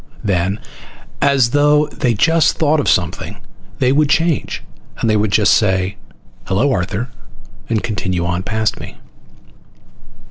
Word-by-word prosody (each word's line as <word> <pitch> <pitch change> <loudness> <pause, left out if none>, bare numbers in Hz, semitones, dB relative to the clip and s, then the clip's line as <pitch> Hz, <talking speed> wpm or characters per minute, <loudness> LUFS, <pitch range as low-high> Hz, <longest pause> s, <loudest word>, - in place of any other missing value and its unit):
Then, 95 +1 0 0.6
as 140 -4 +3
though 150 +1 +4
they 120 -5 -1
just 165 +5 +3
thought 155 0 +2
of 145 - 0
something, 90 -3 -1 0.4
they 130 0 +2
would 145 +1 +2
change, 160 +1 0 0.3
and 110 -2 +1
just 105 0 +4
say, 95 -2 +1 0.5
"Hello, 120 +10 +1
Arthur," 100 +4 -2 0.6
and 110 -3 0
continue 95 -5 -2
on 85 +1 -1
past 110 +2 -1
me. - - -10
110 Hz, 120 wpm, -17 LUFS, 95-145 Hz, 0.6 s, though